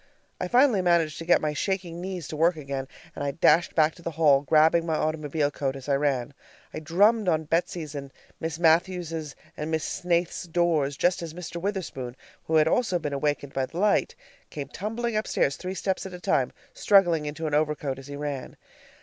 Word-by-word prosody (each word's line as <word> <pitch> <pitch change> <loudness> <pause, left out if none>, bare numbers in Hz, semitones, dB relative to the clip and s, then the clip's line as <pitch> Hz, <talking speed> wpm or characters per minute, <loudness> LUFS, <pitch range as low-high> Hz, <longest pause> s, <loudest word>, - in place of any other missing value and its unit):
I - - -2
finally 250 -5 +4
managed 170 -4 +2
to 165 - -6
get 175 - +4
my 150 -1 -1
shaking 175 +1 -2
knees 180 -5 -5
to - - -5
work 165 +3 +3
again, 140 -3 -5 0.3
and - - -4
I 140 - 0
dashed 165 +4 +3
back 155 -1 +4
to 175 - -16
the 170 - -3
hall, 145 -4 +5
grabbing 155 +3 +4
my 165 -1 -1
automobile 155 -1 -1
coat 135 -2 -2
as 135 0 -9
I 140 - +2
ran. 140 -2 0 0.4
I - - -4
drummed 200 +7 +3
on 160 -2 +1
Betsy's 165 -1 -2
and 140 -2 -7 0.3
Miss 160 -1 -3
Matthews' 165 -2 +1 0.2
and 150 +1 -4
Miss 160 -1 -1
Snaith's 175 0 -1
doors, 160 -5 +1
just 175 0 +2
as 165 -1 -7
Mr. 170 -1 -6
Witherspoon, 170 -11 -4 0.3
who 160 - 0
had 155 0 +5
also 190 0 +2
been 145 -4 -3
wakened 145 -2 -1
by 135 -1 -1
the 170 - -10
light, 205 +2 +2 0.3
came 140 -2 -6
tumbling 225 +6 -3
upstairs 215 -9 +1
three 185 +1 -5
steps 190 +1 -2
at 185 - -9
a - - -9
time, - - +1 0.2
struggling 185 - +3
into 150 +2 -5
an 150 - -2
overcoat 150 -3 0
as 135 - -11
he 145 - -7
ran. 145 -2 -5
160 Hz, 200 wpm, -26 LUFS, 145-175 Hz, 0.4 s, hall